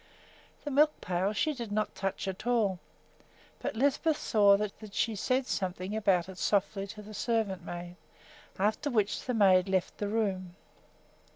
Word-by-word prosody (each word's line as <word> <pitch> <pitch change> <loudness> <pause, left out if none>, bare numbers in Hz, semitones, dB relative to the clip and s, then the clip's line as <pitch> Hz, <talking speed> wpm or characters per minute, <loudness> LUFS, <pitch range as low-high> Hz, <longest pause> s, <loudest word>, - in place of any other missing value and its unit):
The 290 - -4
milk 300 +3 +4
pail 185 +2 0
she 305 +8 0
did 235 -6 -6
not 215 +1 -1
touch 195 0 -3
at 190 +4 -5
all; 215 -7 +2 0.8
but - - -3
Lisbeth 285 +5 +2
saw 205 -3 +4
that 210 0 -6
she 225 - +1
said 255 +6 0
something 185 -1 -3
about 190 -5 +2
it 190 -1 -10
softly 200 0 0
to 210 +1 -9
the 215 +1 -10
servant 210 -5 -1
maid, 175 +1 -7 0.6
after 215 +9 0
which 215 -5 +1
the 250 - -2
maid 190 -3 +5
left 190 -2 -1
the 205 - -1
room. 195 -5 -1
205 Hz, 160 wpm, -30 LUFS, 190-225 Hz, 0.8 s, maid